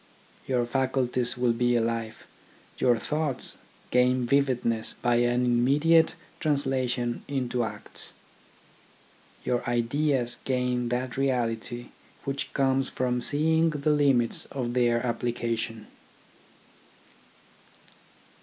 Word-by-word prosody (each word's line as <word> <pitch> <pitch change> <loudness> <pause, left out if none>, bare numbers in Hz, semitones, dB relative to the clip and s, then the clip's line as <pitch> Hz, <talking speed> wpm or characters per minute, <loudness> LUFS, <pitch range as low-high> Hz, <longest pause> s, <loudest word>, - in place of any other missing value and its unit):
Your 125 -2 +1
faculties 125 -1 0
will 125 -1 +2
be 120 +1 +1
alive, 115 -1 -2 0.5
your 120 -2 +3
thoughts 150 +1 -1 0.3
gain 125 0 +3
vividness 120 -4 +1
by 120 -1 +2
an 120 +1 +2
immediate 145 +7 +3 0.2
trans 145 -2 +1
lation 125 -2 -1
into 125 -3 -1
acts. 110 - -2 1.3
Your 125 -1 0
ideas 120 +1 0
gain 125 -2 0
that 125 +1 -2
reality 120 -2 -1 0.3
which 140 0 -3
comes 135 -1 +2
from 125 -1 -1
seeing 160 +5 +2
the 150 -1 0
limits 135 -6 +2
of 125 -3 -4
their 120 -1 +2
application. 115 -2 -2
125 Hz, 100 wpm, -27 LUFS, 120-135 Hz, 1.3 s, your